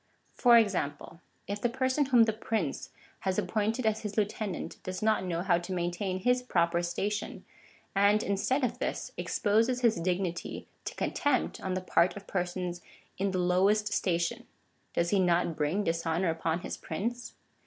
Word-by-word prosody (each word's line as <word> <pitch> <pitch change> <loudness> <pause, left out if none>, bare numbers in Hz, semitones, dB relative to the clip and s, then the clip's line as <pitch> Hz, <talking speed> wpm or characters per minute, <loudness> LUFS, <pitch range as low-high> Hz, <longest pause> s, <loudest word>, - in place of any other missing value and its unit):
oOO - - -19
For 245 -2 +7
examj^le/ 175 -9 +2 0.3
If 205 +1 -4
the 240 - +2
person 260 +3 +1
whom 245 -3 +6
the 220 -1 +1
prince 215 -8 -2 0.3
has 190 -1 -1
appointed 220 +3 0
as 220 0 +2
his 210 -1 -6
lieutenant, 210 -2 -2
does 185 +2 -5
not 215 -3 +3
know 175 -2 -2
how 175 -3 +3
to 175 +2 -7
maintain 185 +1 -2
his 250 +4 +3
proper 170 -7 +1
station,^ 200 +4 -3 0.5
and 205 +2 +4
instead 230 +8 0
of 245 0 -1
this, - - -3
exposes 230 +4 +1
his 230 -3 +3
dignity 175 -1 -2 0.2
to - - -5
contempt 285 -3 0
on 185 -1 -2
the 185 - -1
part 185 +1 +2
of 200 - -9
persons 180 -1 -3 0.4
in 200 +1 +1
the 185 - -2
lowest 195 +4 +2
station, 185 +7 0 0.5
does 170 0 +1
he 200 - +3
not 175 -2 +2
bring 155 +8 0
dishonour 165 0 0
upon 165 +1 -1
his - - -5
prince 235 +9 -4
195 Hz, 165 wpm, -30 LUFS, 175-220 Hz, 0.5 s, For